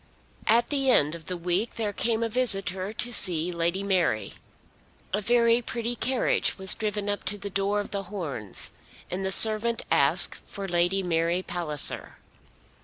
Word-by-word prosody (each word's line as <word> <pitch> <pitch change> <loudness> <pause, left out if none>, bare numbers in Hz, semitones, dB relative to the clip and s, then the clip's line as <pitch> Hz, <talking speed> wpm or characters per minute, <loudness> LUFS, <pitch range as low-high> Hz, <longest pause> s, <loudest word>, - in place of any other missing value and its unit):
At 235 +5 +2
the 275 -2 +1
end 150 - +3
of 165 -2 -11
the 180 - -4
week 180 +6 -2
there 210 -3 -3
came 230 +2 -1
a - - 0
visitor 195 -5 -1
to 240 +3 -3
see 175 -4 +2
Lady 170 +3 -1
Mary. 180 - -1 0.8
A 210 - -1
very 235 +2 +2
pretty 235 +1 -4
carriage 255 +2 0
was 190 -1 +4
driven 210 -1 -4
up 205 0 -3
to 205 - -2
the 200 0 -8
door 200 +2 -1
of 205 - -6
The 200 - -3
Horns, 145 - -3 0.4
and 185 +2 -4
the 190 - -2
servant 220 +3 +7
asked - - +2
for 195 -1 -8
Lady 175 +2 0
Mary 170 +1 -1
Palliser. 170 -6 -2
195 Hz, 165 wpm, -25 LUFS, 175-225 Hz, 0.8 s, servant